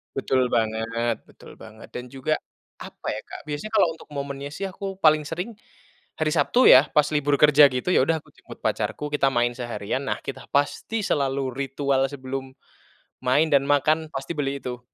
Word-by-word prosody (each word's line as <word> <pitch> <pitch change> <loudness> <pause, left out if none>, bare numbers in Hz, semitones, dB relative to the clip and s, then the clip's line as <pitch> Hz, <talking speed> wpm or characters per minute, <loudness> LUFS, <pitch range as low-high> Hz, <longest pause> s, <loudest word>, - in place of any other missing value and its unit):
Betul 130 -1 +1
banget 115 +1 0
betul - - -15
banget, 110 +1 -12
dan 125 0 -7
juga, 135 +4 -1 0.4
apa - - -10
ya, - - -4
Kak. - - -9
Biasanya, 150 +8 -5
kalau 205 -5 +5
untuk 160 - -12
momennya 140 0 -5
sih, 195 - -4
aku 195 +1 -6
paling 155 -1 +4
sering, 180 +8 -4 0.7
hari 155 -1 +1
Sabtu 175 - +4
ya, 135 +4 +8
pas 150 -1 +5
libur 145 -1 +2
kerja 150 -1 +8
gitu, 130 +5 -3
ya - - +4
udah, 160 0 0
aku - - -22
jemput - - -13
pacarku, 150 - -2
kita 140 -2 +3
main 120 0 +2
seharian, 120 +1 -3
nah - - -1
kita 135 - -7
pasti 145 +10 0
selalu 135 -2 0
ritual 135 0 0
sebelum 135 -1 -6 0.7
main 145 +5 +3
dan 140 -1 +4
makan, 155 +3 +2
pasti 135 +4 -4
beli 140 -1 -2
itu. 125 -1 -5
140 Hz, 175 wpm, -24 LUFS, 130-150 Hz, 0.7 s, ya